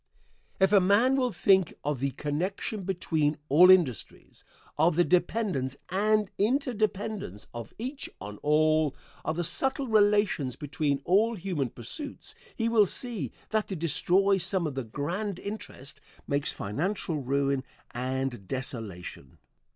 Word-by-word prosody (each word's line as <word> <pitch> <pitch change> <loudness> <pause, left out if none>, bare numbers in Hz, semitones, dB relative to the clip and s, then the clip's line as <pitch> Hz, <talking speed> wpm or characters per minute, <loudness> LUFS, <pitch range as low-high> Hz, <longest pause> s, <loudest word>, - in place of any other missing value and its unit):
If 190 +1 +4
a 200 - +8
man 205 +8 +4
will 255 -2 +1
think 190 -4 +3
of 145 -2 -1
the 140 +2 0
connection 180 - -3
between 160 -5 0
all 175 +6 +7
industries 170 - +2 0.3
of 160 +2 +3
the 175 - +4
dependence 175 - 0
and 210 +2 +2
inter 255 +5 +1
dependence 205 - -3
of 115 -2 -7
each 260 +5 -4
on 105 +1 -8
all; 155 -1 +3 0.3
of 155 - -2
the 175 - -1
subtle 270 - +1
relations 205 - +2
between 145 -1 -2
all 220 +6 +3
human 175 - -2
pursuits 280 - -6 0.2
he 225 - 0
will 220 -3 +4
see 210 - -2 0.2
that 215 -1 +1
to 195 - -4
destroy 185 +4 +2
some 185 0 0
of 150 - -2
the 135 -1 -3
grand 175 - -3
interest 200 -10 -7 0.3
makes 140 +1 +1
financial 160 - -2
ruin 140 0 0 0.3
and 130 -4 -3
desolation. 110 - -5
175 Hz, 135 wpm, -28 LUFS, 140-205 Hz, 0.3 s, a